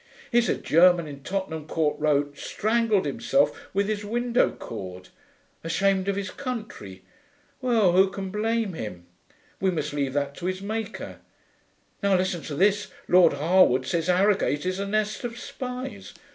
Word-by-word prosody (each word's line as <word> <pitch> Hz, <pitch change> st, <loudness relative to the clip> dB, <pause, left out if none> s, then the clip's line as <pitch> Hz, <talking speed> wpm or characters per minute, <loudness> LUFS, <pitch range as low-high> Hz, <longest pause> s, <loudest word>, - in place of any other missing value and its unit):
'Here's 240 Hz, -1 st, +3 dB
a -, -, +1 dB
German 170 Hz, 0 st, +4 dB
in 140 Hz, -1 st, -9 dB
Tottenham 160 Hz, -3 st, -4 dB
Court 155 Hz, -2 st, 0 dB
Road 145 Hz, -1 st, +1 dB
strangled 220 Hz, +3 st, 0 dB
himself 145 Hz, 0 st, 0 dB
with 200 Hz, +1 st, 0 dB
his 210 Hz, -1 st, -2 dB
window 240 Hz, +3 st, +1 dB
cord. 95 Hz, -4 st, -8 dB, 0.5 s
Ashamed 190 Hz, +3 st, +1 dB
of 200 Hz, -, +1 dB
his 195 Hz, -2 st, -3 dB
country. 215 Hz, -, -6 dB, 0.6 s
Well, 230 Hz, -7 st, +3 dB
who 190 Hz, +2 st, +5 dB
can 190 Hz, -1 st, -6 dB
blame 220 Hz, -1 st, 0 dB
him? 90 Hz, -, -7 dB, 0.5 s
We 190 Hz, -, +2 dB
must 155 Hz, -4 st, -2 dB
leave 140 Hz, -2 st, -1 dB
that 140 Hz, -1 st, -1 dB
to 180 Hz, -, -4 dB
his 185 Hz, 0 st, -2 dB
Maker. 215 Hz, +2 st, -5 dB, 0.8 s
Now 200 Hz, -2 st, +3 dB
listen 180 Hz, -2 st, -1 dB
to 145 Hz, -, -5 dB
this: 205 Hz, +5 st, +2 dB, 0.2 s
Lord 175 Hz, -3 st, +6 dB
Harewood 145 Hz, -4 st, +3 dB
says 170 Hz, -1 st, -1 dB
Harrogate 185 Hz, -4 st, +2 dB
is 185 Hz, +1 st, -1 dB
a 200 Hz, -, -2 dB
nest 215 Hz, +2 st, -1 dB
of 235 Hz, -1 st, -4 dB
spies. 250 Hz, -6 st, -7 dB
185 Hz, 155 wpm, -25 LUFS, 150-210 Hz, 0.8 s, Lord